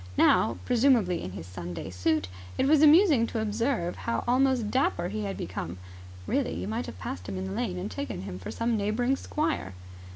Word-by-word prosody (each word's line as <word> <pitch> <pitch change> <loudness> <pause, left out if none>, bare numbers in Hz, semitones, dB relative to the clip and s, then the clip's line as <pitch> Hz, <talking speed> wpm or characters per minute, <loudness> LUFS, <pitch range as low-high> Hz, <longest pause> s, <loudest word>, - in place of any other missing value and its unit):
Now, - - +4
presumably 235 -8 +3
in 95 - -6
his 90 -4 -7
Sunday 90 0 -6
suit, 95 +2 0 0.3
it - - +2
was 295 +1 +5
amusing 305 - +6
to 225 - -3
observe 220 -3 -1
how 235 - -2
almost 255 -3 +2
dapper 180 -9 +1
he 210 +1 -3
had 195 - -4
become. 85 0 -5 0.5
Really, 80 - 0
you 90 +3 -4
might 105 -5 -3
have - - -8
passed 90 0 -6
him 95 - -4
in 95 - -3
the 95 - -5
lane 90 -2 -2
and 90 - -4
taken 95 -1 -4
him 90 -1 -6
for 95 - -7
some 230 0 0
neighbouring 220 +5 +1
squire. 300 - -2
200 Hz, 195 wpm, -28 LUFS, -, 0.5 s, amusing